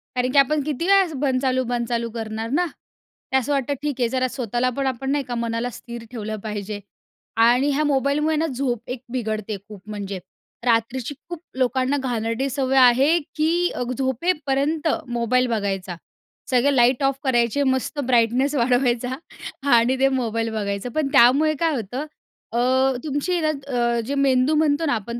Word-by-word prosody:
कारण 250 Hz, 0 st, 0 dB
की 280 Hz, -, 0 dB
आपण 290 Hz, +2 st, +3 dB
किती 305 Hz, +3 st, -2 dB
वेळा 395 Hz, 0 st, +6 dB, 0.2 s
बंद 265 Hz, -2 st, +1 dB
चालू, 260 Hz, -1 st, +1 dB
बंद 240 Hz, -1 st, -1 dB
चालू 235 Hz, -1 st, -1 dB
करणार 225 Hz, 0 st, -4 dB
ना 355 Hz, +7 st, +1 dB
ते. 265 Hz, -4 st, -7 dB
असं 265 Hz, +3 st, -1 dB
वाटतं 280 Hz, 0 st, 0 dB
ठीक 295 Hz, -3 st, -1 dB
आहे. 240 Hz, -, +2 dB
जरा 255 Hz, 0 st, 0 dB
स्वतःला 245 Hz, 0 st, -1 dB
पण 275 Hz, -1 st, 0 dB
आपण 265 Hz, +1 st, -2 dB
नाही 285 Hz, -1 st, 0 dB
का, 245 Hz, -1 st, -5 dB
मनाला 235 Hz, +1 st, -2 dB
स्थिर 235 Hz, 0 st, -9 dB
ठेवलं 215 Hz, -2 st, -4 dB
पाहिजे 210 Hz, -1 st, -4 dB, 0.7 s
आणि 250 Hz, +4 st, +4 dB
ह्या 300 Hz, +2 st, +1 dB
मोबाईलमुळे 290 Hz, +2 st, +1 dB
ना 320 Hz, +2 st, +1 dB
झोप 250 Hz, -4 st, -2 dB
एक 250 Hz, -1 st, -4 dB
बिघडते 215 Hz, -4 st, -3 dB
खूप 210 Hz, -3 st, -11 dB
म्हणजे 200 Hz, -2 st, -5 dB, 0.5 s
रात्रीची, 235 Hz, +3 st, 0 dB, 0.2 s
खूप 345 Hz, -2 st, -6 dB, 0.2 s
लोकांना 260 Hz, +2 st, +1 dB
घाणेरडी 245 Hz, 0 st, -2 dB
सवय 265 Hz, 0 st, 0 dB
आहे, 265 Hz, +6 st, +6 dB, 0.2 s
की 335 Hz, +3 st, +1 dB, 0.3 s
झोपेपर्यंत 290 Hz, +2 st, 0 dB, 0.2 s
मोबाईल 240 Hz, +1 st, +1 dB
बघायचा. 195 Hz, -5 st, -2 dB, 0.5 s
सगळे 265 Hz, +2 st, +3 dB
लाईट 250 Hz, +2 st, +4 dB
ऑफ 270 Hz, 0 st, +2 dB
करायचे, 250 Hz, +1 st, +2 dB
मस्त 260 Hz, +2 st, -1 dB
ब्राईटनेस 250 Hz, +4 st, +2 dB
वाढवायचा 245 Hz, 0 st, +1 dB, 0.6 s
आणि 240 Hz, +3 st, +3 dB
ते 270 Hz, -, +5 dB
मोबाईल 225 Hz, -1 st, -1 dB
बघायचं, 200 Hz, +2 st, -3 dB
पण 310 Hz, -3 st, +1 dB
त्यामुळे 280 Hz, +5 st, +5 dB
काय 325 Hz, -3 st, +1 dB
होतं 245 Hz, +6 st, -4 dB, 0.5 s
अ, 235 Hz, -, -2 dB, 0.5 s
तुमची 290 Hz, +4 st, -1 dB
हे 350 Hz, -, +1 dB
ना 310 Hz, -, +1 dB, 0.3 s
अ, 235 Hz, -1 st, +1 dB
जे 280 Hz, -, -2 dB
मेंदू 270 Hz, +1 st, +3 dB
म्हणतो 305 Hz, +1 st, +2 dB
ना 285 Hz, -, +1 dB
आपण 235 Hz, +3 st, -5 dB
255 Hz, 165 wpm, -22 LUFS, 235-280 Hz, 0.7 s, वेळा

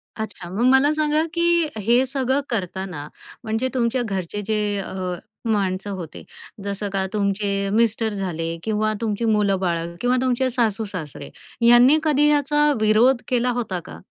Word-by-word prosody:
अच्छा, 205 Hz, -5 st, -6 dB
मग 205 Hz, +6 st, -2 dB
मला 275 Hz, +3 st, +5 dB
सांगा, 305 Hz, 0 st, +1 dB
की 340 Hz, -1 st, +2 dB
हे 240 Hz, +5 st, +3 dB
सगळं 265 Hz, +1 st, 0 dB
करतांना, 185 Hz, -7 st, -4 dB, 0.4 s
म्हणजे 225 Hz, +4 st, -1 dB
तुमच्या 245 Hz, 0 st, 0 dB
घरचे 195 Hz, -1 st, -4 dB
जे 215 Hz, -1 st, +1 dB, 0.2 s
अ, 185 Hz, -1 st, -4 dB, 0.3 s
माणसं 200 Hz, -2 st, -1 dB
होते, 175 Hz, -5 st, -7 dB, 0.4 s
जसं 200 Hz, 0 st, -3 dB
का 195 Hz, -1 st, -1 dB
तुमचे 200 Hz, -1 st, 0 dB
मिस्टर 225 Hz, 0 st, +1 dB
झाले 165 Hz, -4 st, -3 dB
किंवा 215 Hz, 0 st, 0 dB
तुमची 220 Hz, 0 st, -1 dB
मुलं-बाळ 195 Hz, -5 st, +1 dB, 0.2 s
किंवा 250 Hz, +1 st, +2 dB
तुमचे 255 Hz, 0 st, +1 dB
सासू-सासरे, 205 Hz, -, -3 dB, 0.4 s
यांनी 245 Hz, +5 st, +7 dB
कधी 295 Hz, -1 st, +3 dB
याचा 295 Hz, 0 st, +3 dB
विरोध 235 Hz, +4 st, +4 dB
केला 250 Hz, 0 st, +1 dB
होता 190 Hz, -6 st, -3 dB
का? 80 Hz, 0 st, -10 dB
215 Hz, 140 wpm, -22 LUFS, 195-255 Hz, 0.4 s, यांनी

